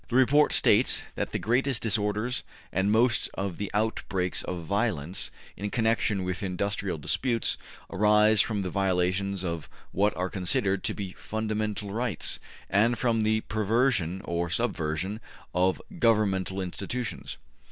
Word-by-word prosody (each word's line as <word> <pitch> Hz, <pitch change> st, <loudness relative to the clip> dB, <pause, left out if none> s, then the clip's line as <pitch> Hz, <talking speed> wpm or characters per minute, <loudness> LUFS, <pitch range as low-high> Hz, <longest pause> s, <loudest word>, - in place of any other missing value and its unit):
The 120 Hz, -, -2 dB
report 140 Hz, +3 st, +5 dB
states -, -, +4 dB
that -, -, -3 dB
``the -, -, -1 dB
greatest 125 Hz, +2 st, +1 dB
disorders 105 Hz, +2 st, 0 dB, 0.3 s
and 95 Hz, +2 st, +2 dB
most 115 Hz, +1 st, +3 dB
of 95 Hz, -3 st, -3 dB
the 100 Hz, -, -3 dB
outbreaks 100 Hz, -4 st, 0 dB
of 90 Hz, -2 st, -4 dB
violence 100 Hz, -4 st, -1 dB, 0.3 s
in 105 Hz, +2 st, -4 dB
connection 110 Hz, -3 st, +1 dB
with 90 Hz, 0 st, -3 dB
industrial 100 Hz, -1 st, -2 dB
`disputes 115 Hz, -, 0 dB, 0.3 s
arise 105 Hz, +2 st, +4 dB
from 105 Hz, -3 st, -1 dB
the 90 Hz, -, -3 dB
violation 95 Hz, 0 st, +1 dB
of 85 Hz, -3 st, -4 dB, 0.2 s
what 105 Hz, +2 st, +1 dB
are 90 Hz, 0 st, -1 dB
considered 95 Hz, +1 st, 0 dB
to -, -, -1 dB
be 100 Hz, -3 st, -5 dB
fundamental 110 Hz, -2 st, -3 dB
rights, 115 Hz, +1 st, -2 dB, 0.3 s
and 115 Hz, +5 st, +3 dB
from 115 Hz, -3 st, +1 dB
the 110 Hz, 0 st, +2 dB
perversion 110 Hz, -5 st, +1 dB
or 85 Hz, 0 st, -2 dB
subversion 80 Hz, +5 st, -1 dB, 0.3 s
of 90 Hz, +1 st, +2 dB, 0.2 s
governmental 100 Hz, -, +2 dB
institutions'' 100 Hz, +6 st, -4 dB
(p. -, -, -28 dB
100 Hz, 140 wpm, -28 LUFS, 95-110 Hz, 0.3 s, report